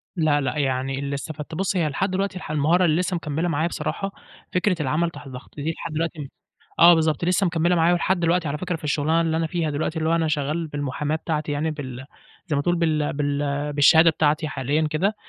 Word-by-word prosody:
لأ، 155 -4 +2
لأ. 140 +3 -2
يعني 135 -1 -1
اللي 140 0 -3
استفدته 155 +2 -6
بُص 195 0 -1
هي 170 -4 +2
لحد 185 +7 -1
دلوقتي 195 0 -1
الح 180 - -7
المهارة 160 +5 +3
اللي 160 +1 +2
لسّه 180 0 -1
مكمّلة 160 0 -2
معايا 160 0 0
بصراحة، 195 +3 -3 0.4
فكرة 180 +1 +2
العمل 155 +5 0
تحت 145 -3 -11
ضغط، 130 0 -11
دي 150 +2 -2
لحد 165 - -7
دلوقتي 155 -3 -3 0.5
آه 175 +1 +9
بالضبط، 160 -1 +1
لسّه 185 +2 +2
مكمّلة 170 +1 +2
معايا 170 +1 +4
ولحد 175 +1 +1
دلوقتي 170 -1 +1
على 145 +1 -2
فكرة 180 +2 -3
في 160 - -10
الشُغلانة 150 +2 +1
اللي 160 -1 0
أنا 165 0 0
فيها 165 -1 -1
دلوقتي 155 +2 -2
اللي 160 +1 0
هو 165 - +3
أنا 165 -1 +1
شغّال 155 +2 -1
بالمحاماة 145 +1 -2
بتاعتي 155 -1 -3
يعني 150 +2 -1
بال 130 -4 -7 0.4
زي 155 - 0
ما 140 - +1
تقول 175 +4 +1
بال 155 -3 0
بال 145 0 -1
بالشهادة 160 +3 +6
بتاعتي 155 0 +1
حاليًا 145 +3 0
كده، 185 +8 0
155 Hz, 215 wpm, -23 LUFS, 145-170 Hz, 0.5 s, آه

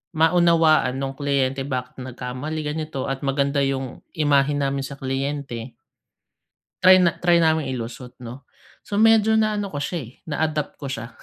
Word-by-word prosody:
maunawaan 160 -4 +4
nung 135 0 -3
kliyente 135 -1 0
bakit 125 -2 -4
nagkamali, 130 +5 -5
ganito 150 -2 -3
at 135 -1 -3
maganda 140 +1 0
yung 135 -2 -2 0.2
imahe 145 -1 +3
namin 140 -1 -1
sa 135 +1 -7
kliyente 135 -3 -4 1.1
Try 185 0 +8
na 170 -3 +3
try 175 -1 +4
naming 160 -4 +2
ilusot 125 +1 -7
'no. 125 +3 -9 0.4
So, 205 0 -2
medyo 220 -1 +5
naano 210 -3 0
ko 145 - -3
siya, 170 +5 -3
eh, 115 - -13 0.2
na-adapt 155 -1 -2
ko 140 - -8
siya. 120 -3 -5
140 Hz, 150 wpm, -23 LUFS, 135-160 Hz, 1.1 s, Try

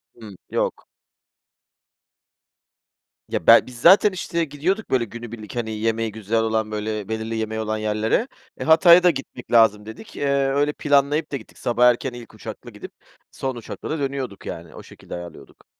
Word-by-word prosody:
Hımm, - - -12
yok. - - -2 2.4
Ya, - - -4
bel - - +8
biz 125 -1 -11
zaten 195 +6 +7
işte 170 -2 -2
gidiyorduk 165 +9 -2
böyle 125 -3 +1
günübirlik, 115 -1 -9
hani, 115 -2 -3
yemeği 115 0 -1
güzel 110 +1 -1
olan 110 -1 -1
böyle 105 -1 -4
belirli 110 0 -3
yemeği 110 0 -3
olan 110 0 -2
yerlere, 110 - 0 0.3
eee, - - -4
Hatay'a 170 +2 +7
da 180 - +6
gitmek 135 -5 -6
lazım 110 -3 +4
dedik. 110 - -11
Eee, - - -3 0.2
öyle 145 +2 +1
planlayıp 145 +2 +1
da 140 - -1
gittik. 110 - -16
Sabah 120 0 +2
erken 125 +2 -1
ilk 120 -2 -11
uçakla - - -9
gidip - - -10 0.4
son 130 -1 -4
uçakla 120 - -8
da 155 - -2
dönüyorduk 135 -7 -4
yani, 85 -1 -8
o - - -10
şekilde - - -11
ayarlıyorduk. 85 0 -11
120 Hz, 165 wpm, -22 LUFS, 110-145 Hz, 2.4 s, bel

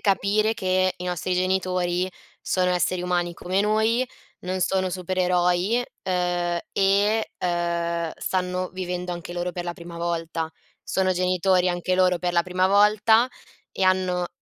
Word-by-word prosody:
capire 205 +2 +2
che 185 -2 +1
i 180 - -7
nostri 180 0 -2
genitori 185 -1 0 0.3
sono 180 -1 +1
esseri 180 0 +1
umani 175 -1 0
come 185 +2 -1
noi, 220 +4 +2 0.3
non 185 +1 -3
sono 185 0 +1
supereroi, 180 +4 +1 0.2
ehm, 175 -1 0
e, 200 +3 +2
ehm, 170 -1 -1
stanno 185 0 -2
vivendo 180 -1 -4
anche 175 0 -7
loro 175 0 -2
per 175 0 -5
la 175 - -3
prima 170 0 -10
volta. 165 -1 -2 0.3
Sono 185 -1 +1
genitori 185 0 +2
anche 175 +1 0
loro 180 -1 +3
per 175 -1 -1
la 170 0 +3
prima 185 +1 +1
volta 210 +4 +4 0.4
e - - -3
hanno 185 -1 +2
180 Hz, 140 wpm, -24 LUFS, 175-190 Hz, 0.4 s, volta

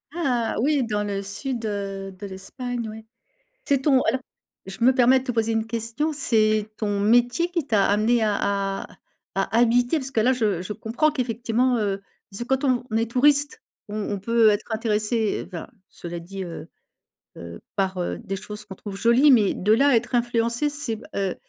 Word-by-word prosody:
Ah 250 -9 0
oui, 285 +1 +2
dans 210 -3 -1
le 200 -1 -2
sud, 230 +4 -4
heu, 195 -2 -4
de 200 - -7
l'Espagne, 235 +5 -5
oui. 220 +1 -10 0.6
C'est 280 - +2
ton 265 -2 +4
alors, 255 +4 0 0.5
je 195 +4 -8
me 260 - +7
permets 260 0 +5
de - - -11
te 255 - -2
poser 225 -1 0
une 225 0 0
question, 230 +7 -2
c'est 215 -6 +1
ton 205 -2 -1
métier 245 +10 +3
qui 340 -5 -2
t'a 205 -7 +3
amené 220 +3 +2
à 210 -1 +2 0.5
à - - -29 0.5
à 195 +3 0
habiter, 245 +5 +3
parce 265 -2 -5
que 235 - +1
là, 250 +4 +4
je 210 -8 0
je 185 - -5
comprends 230 +8 0
qu'effectivement, 245 -1 0
heu, 200 -2 -1 0.3
parce 195 +4 -7
que - - -2
quand 265 +1 +1
on 245 -4 0
est 225 0 +1
touriste, 285 +3 +2 0.3
on 210 0 -4
on 200 - -2
peut 230 +3 +3
être 205 - 0
intéressé, 220 0 0
enfin, 175 -3 -7 0.2
cela 175 0 -7
dit, 190 +3 -7
heu 170 -2 -8 0.7
heu, 85 0 -9 0.2
par, 190 -2 0
heu, 175 - -2
des 195 -4 -5
choses 210 +2 -8
qu'on 195 -2 -10
trouve 200 +1 -8
jolies, 235 +8 +4
mais 215 -6 +4
de 210 +4 +2
là 275 +5 +4
à 265 - +5
être 245 +2 0
influencé, 235 +3 +1
c'est 290 -5 -4
b 215 - -12
heu, 195 -2 -1
225 Hz, 195 wpm, -24 LUFS, 205-250 Hz, 0.7 s, me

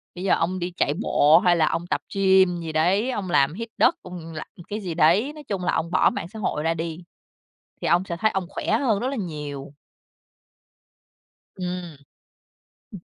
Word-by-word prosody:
bây 180 - -6
giờ 195 - +3
ông 185 +3 -1
đi 175 +1 -3
chạy 145 - +2
bộ 155 -4 +5
hay 175 -1 +3
là 160 -2 +3
ông 175 +1 -3
tập - - -1
gym 190 -2 +4
gì 160 -1 -5
đấy, 185 +10 +2
ông 200 -6 -4
làm 140 -3 +3
hít 230 +4 -6
đất, - - +4
ông 170 -3 -9
làm 155 - -6 0.2
cái 210 - -3
gì 185 -5 -4
đấy. 175 - +3
Nói 300 -1 -11
chung 195 -3 -3
là - - 0
ông 165 +1 -1
bỏ - - +4
mạng - - -5
xã 220 +2 -9
hội 150 -7 -2
ra 165 +1 +1
đi, 165 +1 -5 0.8
thì - - 0
ông 175 +2 +3
sẽ 175 -3 -4
thấy 220 +5 +2
ông 190 -3 -2
khỏe - - -4
hơn 225 -7 +1
rất 250 - -1
là 275 - -3
nhiều. 150 - -6 1.9
Ừm, 180 -3 -5 1.0
ừm. 195 - -8
180 Hz, 200 wpm, -24 LUFS, 165-195 Hz, 1.9 s, bộ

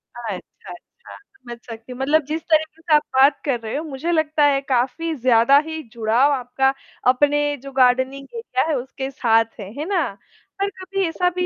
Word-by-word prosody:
अच्छा, 235 -3 -5
अच्छा। - - -14 0.7
समझ 240 -1 -9
सकती 230 +1 -10
हूँ, 250 - -8
मतलब 300 +4 +3
जिस 310 +3 -3
तरीके 315 0 +1
से 330 - 0
आप 300 - +5
बात 275 +2 +5
कर 255 -5 0
रहे 225 -1 -5
हो 300 - -2
मुझे 310 +2 -4
लगता 315 -2 +1
है 275 -1 +3
काफ़ी 275 +5 -1
ज़्यादा 245 0 +4
ही 320 0 -5
जुड़ाव 235 +5 +2
आपका, 265 +1 0 0.3
अपने 290 +3 +3 0.2
जो 275 - -8
गार्डनिंग 260 +1 +2
एरिया 260 - -1
है 310 - +1
उसके 265 +1 -5
साथ 225 -4 +3
है, 195 -1 -7
है 300 - -3
ना? 360 -7 +1 0.5
पर 400 0 0
कभी 385 0 -3
ऐसा 360 +2 0
भी 360 0 0
275 Hz, 190 wpm, -21 LUFS, 250-315 Hz, 0.7 s, आप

